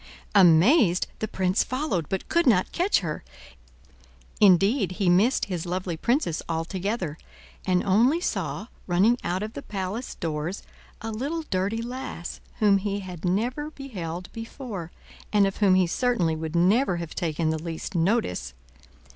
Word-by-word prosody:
Amazed, 185 - +5
the 220 - -2
prince 190 0 +1
followed, 255 - -2
but 190 - -3
could 340 -3 +2
not 190 -7 +3
catch 360 - +2
her. 155 -4 -4 1.2
Indeed 195 +1 +4
he 190 -1 +1
missed 205 +9 +3
his 180 -3 -4
lovely 180 -1 -2
princess 235 - 0
altogether, 175 +1 -2 0.5
and 180 -1 +2
only 235 - +3
saw 350 - -2 0.2
running 200 +7 +3
out 180 +3 -1
of 215 +1 -5
the - - -6
palace 200 +5 -4
doors, 160 +3 -3 0.4
a 225 - -4
little 285 +9 -3
dirty 205 -1 -1
lass 245 -8 -6 0.2
whom 205 -2 +4
he 200 0 -2
had 180 -4 -9
never 240 +11 -1
beheld 185 - -6
before, 225 - -7 0.4
and 205 -1 +4
of 195 - -2
whom 195 -3 +4
he 185 -1 +4
certainly 180 -4 +1
would 160 +1 -5
never 185 +3 +3
have 170 -2 -6
taken 160 -1 -1
the 160 -1 -3
least 165 +2 -5
notice. 165 - 0
190 Hz, 145 wpm, -26 LUFS, 175-230 Hz, 1.2 s, Amazed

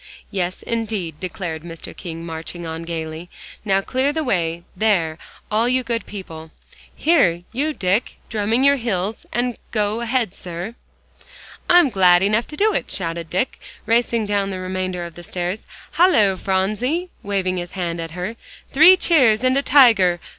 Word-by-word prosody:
"Yes, 185 -2 -3
indeed," 210 -9 -3
declared 180 -4 -5
Mr. 165 0 -9
King, 165 -1 -7
marching 165 +1 -6
on 160 0 -5
gaily. 165 0 -5 0.3
"Now 195 -2 +2
clear 260 +7 0
the 315 +1 -2
way 170 - -1
there, 175 -6 +1 0.3
all 225 +3 +2
you 255 0 +1
good 230 -1 -3
people. 165 -6 -8 0.5
Here, 185 - +3
you 285 +6 -1
Dick, 200 -3 0
drumming 220 +3 0
your 280 0 +5
heels, 215 -3 -3 0.4
go 215 +1 -1
ahead, 235 -4 0
sir." 175 +5 -6 1.0
"I'm 350 -5 +6
glad 180 -2 +5
enough 215 +4 +1
to," 415 +8 +1
shouted 165 -3 -3
Dick, 190 +9 -1 0.3
racing 230 -1 +1
down 200 -1 0
the 190 - -4
remainder 185 -1 -3
of 170 - -9
the 175 - -11
stairs. 180 +4 -4 0.2
"Halloo, 295 - +4
Phronsie," 215 - -1
waving 190 -2 -1
his 175 0 -5
hand 170 -3 -3
at 165 - -5
her, 200 +6 -4 0.3
"three 330 +7 +8
cheers 255 -12 +4
and 255 0 +3
a 275 - +3
tiger! 225 -12 +5
195 Hz, 150 wpm, -21 LUFS, 175-235 Hz, 1.0 s, three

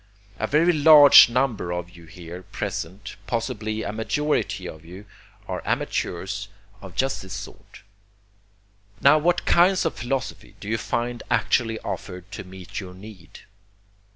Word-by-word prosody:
A - - -1
very 165 +4 +3
large 150 -4 +9
number 120 -7 -1
of 90 0 -4
you 85 -2 -15
here 85 +1 -10
present, 95 +2 -6
possibly 110 -2 -3
a - - -3
majority 150 +7 -1
of 80 0 -10
you, 90 +5 -12 0.4
are - - -4
amateurs 95 +3 -3 0.3
of 95 -3 -11
just 135 0 -1
this 95 -2 -8
sort. - - -11 1.2
Now 140 +2 +5
what 175 +3 +1
kinds 180 +2 +4
of 165 - 0
philosophy 130 +2 -5
do 100 - -10
you 110 +1 -1
find 120 +2 -3
actually 115 -2 +1
offered 90 0 -7
to - - -7
meet 95 -1 -9
your 90 -2 -9
need? 95 -3 -13
110 Hz, 140 wpm, -24 LUFS, 90-135 Hz, 1.2 s, large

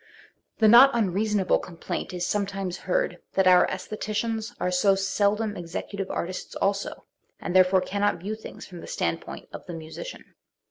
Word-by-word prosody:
The 220 - +5
not 240 +5 +9
unreasonable 205 -2 +1
complaint 170 -2 -5
is 180 -1 -2
sometimes 195 -3 -2
heard - - +1
that 190 - +3
our 180 -1 +6
sestheticians 215 +4 -3
are 180 - 0
so 195 +2 +4
seldom 205 +2 0
executive, 185 +3 -5
artists 185 +2 -4
also, 195 0 -1 0.3
and 175 - -4
therefore 185 0 +5
cannot 200 +2 0
view 200 +5 -4
things 220 - -9
from 180 -2 -10
the - - -10
standpoint; 85 0 -3
of - - -8
the 175 - -6
musician. 160 - -9
195 Hz, 150 wpm, -26 LUFS, 180-215 Hz, 0.3 s, not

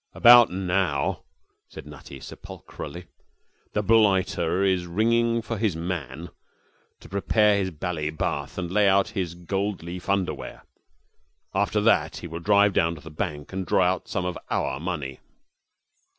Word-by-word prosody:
'About 120 -1 +8
now,' 90 -6 -1 0.5
said - - -10
Nutty, 70 -2 -11
sepulchrally, - - -9 0.7
'the 105 - 0
blighter 95 -4 +2
is 95 -2 +1
ringing 115 +5 +1
for 115 -1 -4
his 105 -6 0
man 85 -2 -5 0.7
to - - -13
prepare 105 +2 +2
his 95 -2 0
bally 80 -2 -3
bath 75 -2 -3
and 90 -2 -4
lay 105 0 +4
out 95 0 +3
his 90 -3 -3
gold 95 +2 -3
leaf 90 +2 -7
underwear. 100 -2 -2 0.9
After - - +1
that - - +2
he 85 - -7
will 85 0 -6
drive 100 +2 +4
down 85 -1 +1
to 75 - -12
the 80 - -11
bank 75 +1 -5
and 95 0 -2
draw 90 0 +2
some 90 - -3
of 90 -1 -3
our 65 0 -1
money.' 75 -6 -4
90 Hz, 145 wpm, -25 LUFS, 85-100 Hz, 0.9 s, About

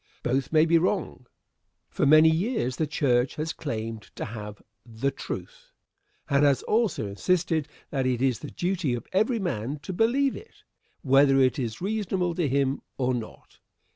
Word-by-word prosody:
Both 135 +3 -1
may 155 0 +5
be 165 0 +4
wrong. 170 -8 -2 0.6
For - - +1
many 155 +2 +7
years 160 - -1
the 155 - 0
church 125 -4 +1
has 155 +2 -3
claimed 115 -6 -4
to - - -4
have 105 -2 -8 0.2
the 120 +4 -2
"truth," - - -8 0.6
and 140 -1 +3
has 140 -2 +3
also 220 - +1
insisted 160 - 0 0.2
that 135 -3 0
it 125 -2 0
is 130 -3 +1
the 145 - -8
duty 175 -8 -1
of 120 - -7
every 220 +5 +2
man 145 - -3
to 190 - -5
believe 250 +7 +2
it, 450 - -13 0.4
whether 135 0 +5
it 130 +2 +3
is 115 0 -4
reasonable 190 -3 -1
to 170 -3 0
him 135 0 0 0.2
or 130 -1 +1
not. 120 -3 -8
145 Hz, 165 wpm, -26 LUFS, 125-180 Hz, 0.6 s, many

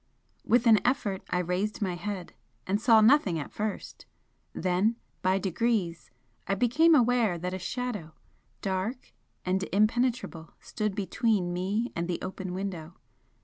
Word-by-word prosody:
With 240 +1 +3
an 220 -3 +7
effort, 235 -7 0
I 180 - 0
raised 180 +4 -1
my 190 -4 -1
head, 185 0 -5 0.3
and 200 +3 0
saw 225 -2 +6
nothing 215 - +4
at 150 - -5
first 210 -1 -5 0.4
then, 185 +5 +1 0.3
by 185 0 +2
degrees, 190 -2 -1 0.4
I 195 - +1
became 295 - +4
aware 240 -7 +3
that 180 +2 -4
a 185 - -3
Shadow, 205 -5 -4 0.5
dark 195 +6 -3 0.3
and 185 +1 +1
impenetrable, 215 -5 0
stood 210 -3 -3
between 200 -2 0
me 200 +7 -1
and 170 0 -2
the 175 - -1
open 185 0 -5
window. 180 -4 -5
195 Hz, 140 wpm, -28 LUFS, 180-230 Hz, 0.5 s, an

